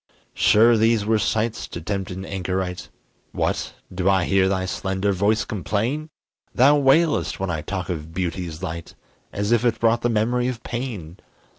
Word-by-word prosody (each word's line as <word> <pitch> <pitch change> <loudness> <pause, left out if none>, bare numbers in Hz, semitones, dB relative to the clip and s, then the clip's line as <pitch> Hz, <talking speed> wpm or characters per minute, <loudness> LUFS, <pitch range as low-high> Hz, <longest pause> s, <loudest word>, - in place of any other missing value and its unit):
Sure 115 +3 +5
these 110 -1 +2
were 110 0 +2
sights 110 +2 -1
to - - -7
tempt 95 +2 -3
an 95 +1 -6
anchorite! 90 -2 -3 0.4
What! - - -1 0.2
do 90 +1 +1
I 95 -2 +3
hear 95 +1 +3
thy 95 -1 0
slender 95 0 -1
voice 100 +4 +1
complain? 115 - -2 0.5
Thou 140 +4 +6
wailest 150 +3 +3
when 95 -2 -2
I 80 -2 -2
talk 90 +3 -4
of 80 -3 -5
beauty's 85 -1 -4
light, 85 -2 -6 0.4
As 100 +2 -2
if 120 -1 +3
it 115 -2 +1
brought 115 +1 +2
the 120 - +1
memory 120 +3 +1
of 120 -2 -4
pain. 110 -9 -5
100 Hz, 165 wpm, -23 LUFS, 90-115 Hz, 0.5 s, Thou